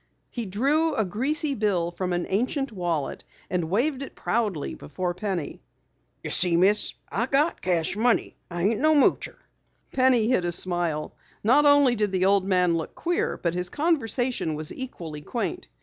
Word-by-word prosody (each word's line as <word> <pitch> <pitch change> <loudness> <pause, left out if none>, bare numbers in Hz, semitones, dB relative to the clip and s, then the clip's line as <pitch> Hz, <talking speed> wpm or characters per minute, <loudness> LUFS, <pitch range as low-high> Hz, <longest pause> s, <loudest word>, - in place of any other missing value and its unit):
He 235 -4 -5
drew 285 - +1
a 220 - +1
greasy 280 - 0
bill 195 -8 0
from 180 +1 -4
an 175 0 -1
ancient 255 +7 -1
wallet 175 -8 -3 0.3
and 175 -3 -1
waved 255 - 0
it 275 - -8
proudly 210 -10 -2
before 175 +4 -4
Penny. 180 -4 -4 0.6
"Ye - - -3
see, 175 -2 +6
Miss, 200 +4 +2 0.2
I 235 - -1
got 285 +5 +1
cash 175 -1 0
money. 235 +2 +1
I 175 -1 -4
ain't 210 +2 +1
no 310 +1 +4
moocher." 285 - +2 0.5
Penny 255 -4 +3
hid 240 -7 +2
a 175 - -1
smile. 175 -3 0 0.3
Not 275 +7 +4
only 285 -3 +5
did 210 -3 -1
the 185 -1 +1
old 195 -1 +3
man 180 -3 +2
look 160 - -6
queer 345 0 -1
but 170 -2 -2
his 180 0 -2
conversation 255 - 0
was 155 0 -2
equally 165 - -7
quaint. 250 - -4
205 Hz, 165 wpm, -25 LUFS, 175-260 Hz, 0.6 s, see